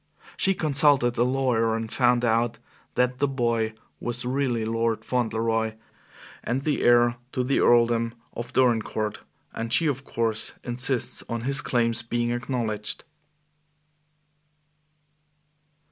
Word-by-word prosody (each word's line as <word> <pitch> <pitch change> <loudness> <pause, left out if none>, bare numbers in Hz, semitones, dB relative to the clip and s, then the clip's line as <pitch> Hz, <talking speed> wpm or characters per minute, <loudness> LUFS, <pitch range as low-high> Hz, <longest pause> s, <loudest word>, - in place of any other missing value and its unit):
She 195 0 +2
consulted 140 -5 +3
a - - +5
lawyer 125 -3 +1
and 115 0 -4
found 125 -1 +3
out 115 0 +1 0.4
that 125 0 +1
the 145 - +2
boy 115 -4 -1 0.2
was 120 +1 -4
really 125 -3 0
Lord 115 0 -1
Fauntleroy 115 -2 0 0.7
and 130 +3 -2
the 150 -1 0
heir 120 0 +4 0.2
to 125 - 0
the 135 +2 +1
earldom 115 -1 +3 0.2
of 120 +1 -6
Dorincourt; 110 -4 +1 0.3
and 115 0 -4
she, 165 - +4
of 135 -3 -1
course, 115 -4 -1
insists 125 +1 0
on 115 0 -3
his 135 +4 +2
claims 115 -4 +1
being 120 0 -1
acknowledged." 120 -4 -3
120 Hz, 120 wpm, -25 LUFS, 115-125 Hz, 0.7 s, a